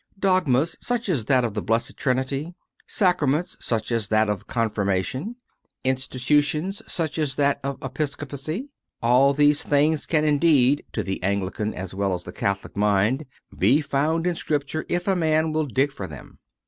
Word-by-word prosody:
Dogmas 175 -6 +2
such 245 -2 -1
as 135 -12 0
that 130 +1 +3
of 115 - -3
the 105 - -2
Blessed 115 +2 -1
Trinity, 135 +5 -1 0.3
sacraments 175 -5 +1
such 115 0 -2
as 115 -3 0
that 110 0 +2
of 105 -3 -3
Confirmation, 115 - -1 0.5
institutions 145 - 0
such 160 -1 -2
as 145 -4 -1
that 140 -1 +2
of 140 0 -3
Episco 140 +2 -3
pacy 155 - -5 0.3
all 130 +4 +4
these 145 0 +4
things 150 +1 +1
can 155 -2 +2
indeed, 145 -3 +4
to - - -1
the 95 - -4
Anglican 100 +2 -1
as 95 0 -6
well 100 -1 0
as 90 - -6
the 90 - -9
Catholic 100 0 -2
mind, 105 +7 +2 0.3
be 145 - +4
found 155 +3 0
in 180 - +2
Scripture 150 -1 -2
if 175 +1 -1
a 195 - +3
man 160 -2 +2
will 155 -1 0
dig 135 +3 +1
for 100 -9 -6
them. 75 -5 -12
140 Hz, 165 wpm, -24 LUFS, 115-155 Hz, 0.5 s, all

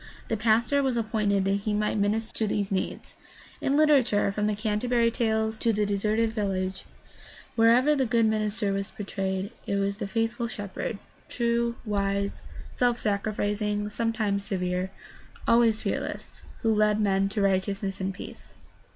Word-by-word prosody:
The 225 - +1
pastor 230 +6 +2
was 260 -3 0
appointed 210 -3 +1
that 195 +1 +2
he 210 - +1
might 210 0 0
minister 215 +2 0
to 220 - +1
these 205 -1 -1
needs. 190 -1 -3 0.5
In 275 +1 +1
literature, 275 -10 +4
from 210 +1 -1
the 210 - 0
Canterbury 230 +3 +1
Tales 220 -2 0
to 230 - +2
The 210 -1 +1
Deserted 215 +3 +1
Village, 190 -3 -2 0.7
wherever 245 +6 +5
the 265 -3 +1
good 230 0 +3
minister 215 -1 0
was 195 +1 -2
portrayed 195 -1 -3 0.2
it 200 - 0
was 200 0 0
the 200 - -4
faith 225 +3 0
ful 235 -1 -3
shepherd, 205 -1 -5 0.3
true, 235 0 0
wise, 200 -1 -1 0.3
self 245 -1 +1
sacrificing, 210 0 -1
sometimes 215 -3 -1
severe, 180 -1 -2 0.6
always 230 -2 +4
fearless, - - -4 0.2
who 225 -1 +3
led 210 0 +3
men 195 -1 +2
to 205 +1 -2
righteousness 195 0 0
and 190 +1 -1
peace. 185 - -11
210 Hz, 150 wpm, -27 LUFS, 200-230 Hz, 0.7 s, wherever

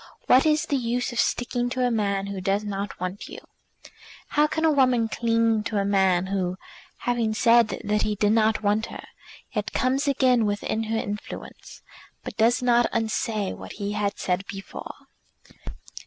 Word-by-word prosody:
"What 260 +5 +5
is 305 0 +2
the 280 - 0
use 245 +1 -1
of 240 - -4
sticking 245 0 0
to 255 0 0
a 245 - +1
man 200 -3 0
who 200 -1 -5
does 195 +3 0
not 200 0 -4
want 185 +2 -5
you?" - - -9 0.9
How 300 0 +3
can 320 +2 -1
a 320 - +5
woman 255 -5 +3
cling 230 -1 +1
to 215 - -2
a 200 - +1
man 190 -2 +2
who, 185 -2 -2 0.4
having 235 -3 0
said 235 0 +5 0.2
that 210 0 0
he 210 - 0
did 205 +1 +2
not 220 -1 +2
want 210 +2 +1
her, - - -9 0.5
yet 210 -3 -3
comes 265 +4 +1
again 255 -5 +3
within 205 +2 -2
her 225 +1 -1
influence, 210 -1 -7 0.4
but - - -7
does 235 +2 +2
not 240 -1 +4
unsay 220 -2 -1
what - - -9
he 200 0 -4
had 205 -1 -1
said 180 +1 -1
before? 195 0 -7
220 Hz, 170 wpm, -25 LUFS, 205-245 Hz, 0.9 s, What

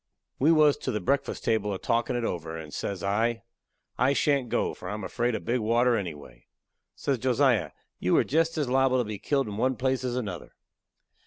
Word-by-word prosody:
We 150 +5 +5
was 150 -3 +5
to - - -5
the 105 - -1
breakfast 140 +9 -1
table 105 -3 0
a - - -3
talkin' 115 +5 0
it 120 - -1
over, 80 -5 -3
and 80 -2 -9
says 100 -3 -4
I: 115 +4 0 0.6
"I 130 +2 +4
shan't 140 -3 +1
go, - - 0
for 90 - -8
I 105 - -3
am 105 - -6
afraid 120 +4 -1
of - - -6
big 125 +2 +1
water, 120 +2 +3
anyway." 75 - -6 0.5
Says 135 -3 -1
Josiah: 125 - +2 0.3
"You 90 - +2
are - - +4
jest 165 +3 +1
as 150 -3 0
liable 130 0 +3
to 125 - +2
be 105 -2 -6
killed 140 -4 0
in 105 -1 -5
one 130 +3 +1
place 130 +2 0
as 125 -1 -2
another." 105 -8 -5
120 Hz, 210 wpm, -27 LUFS, 100-130 Hz, 0.6 s, We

